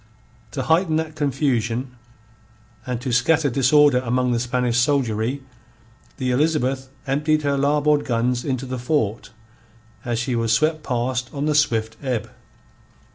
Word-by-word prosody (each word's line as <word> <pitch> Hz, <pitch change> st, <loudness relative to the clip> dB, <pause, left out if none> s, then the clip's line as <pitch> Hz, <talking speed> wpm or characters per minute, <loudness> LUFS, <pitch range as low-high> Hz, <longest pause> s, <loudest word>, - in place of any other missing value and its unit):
To 135 Hz, -, -2 dB
heighten 160 Hz, +2 st, +2 dB
that 160 Hz, -1 st, -2 dB
confusion, 125 Hz, -4 st, -1 dB, 0.9 s
and 125 Hz, -2 st, -2 dB
to 130 Hz, -1 st, -3 dB
scatter 145 Hz, +4 st, +2 dB
disorder 135 Hz, +1 st, +4 dB
among 125 Hz, 0 st, 0 dB
the 120 Hz, -, +1 dB
Spanish 125 Hz, 0 st, 0 dB
soldiery, 125 Hz, -1 st, 0 dB, 0.7 s
the 130 Hz, -2 st, -1 dB
Elizabeth 135 Hz, -2 st, 0 dB, 0.2 s
emptied 150 Hz, +3 st, +1 dB
her 140 Hz, -1 st, +1 dB
larboard 145 Hz, +1 st, +2 dB
guns 120 Hz, +1 st, 0 dB
into 135 Hz, -2 st, -2 dB
the 130 Hz, -1 st, -5 dB
fort 120 Hz, -5 st, -1 dB, 0.7 s
as 120 Hz, -1 st, -2 dB
she 120 Hz, +1 st, -1 dB
was 115 Hz, -1 st, +1 dB
swept 155 Hz, +5 st, +1 dB
past 125 Hz, -1 st, -2 dB
on 145 Hz, 0 st, -2 dB
the 155 Hz, -, +1 dB
swift 115 Hz, -7 st, +1 dB
ebb. 120 Hz, -6 st, -3 dB
130 Hz, 135 wpm, -22 LUFS, 120-145 Hz, 0.9 s, disorder